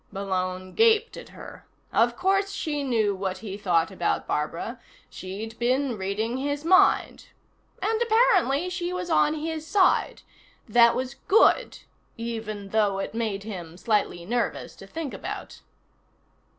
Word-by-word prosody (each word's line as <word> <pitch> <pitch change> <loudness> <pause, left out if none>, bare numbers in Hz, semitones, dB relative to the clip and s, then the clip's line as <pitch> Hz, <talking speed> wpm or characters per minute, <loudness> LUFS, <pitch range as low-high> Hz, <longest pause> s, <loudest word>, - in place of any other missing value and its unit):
Malone 185 -1 -3
gaped 450 0 +3
at - - -10
her. - - -11 0.3
Of - - +3
course 390 +2 +2
she 295 -6 -2
knew 225 -6 +1
what 190 -1 -3
he 195 -2 -5
thought 180 -5 +1
about 175 -2 -1
Barbara; 170 +10 -3 0.3
she'd 210 +5 -7
been 255 +1 +1
reading 210 +5 -2
his 285 +2 -3
mind. 375 +3 +3 0.6
And, 445 +3 0
apparently, 430 - +3
she 360 -1 -3
was 360 -1 -4
on 305 -1 +3
his 315 0 -4
side. 385 -1 +2 0.4
That 235 +1 +5
was 260 +1 -4
good, 435 - +4 0.4
even 220 -3 -5
though 205 -2 +1
it 195 - -4
made 220 -4 -2
him 175 -6 -8
slightly 205 -4 0
nervous 235 +4 -2
to - - -12
think 320 -4 -5
about. - - -7
235 Hz, 135 wpm, -26 LUFS, 195-330 Hz, 0.6 s, That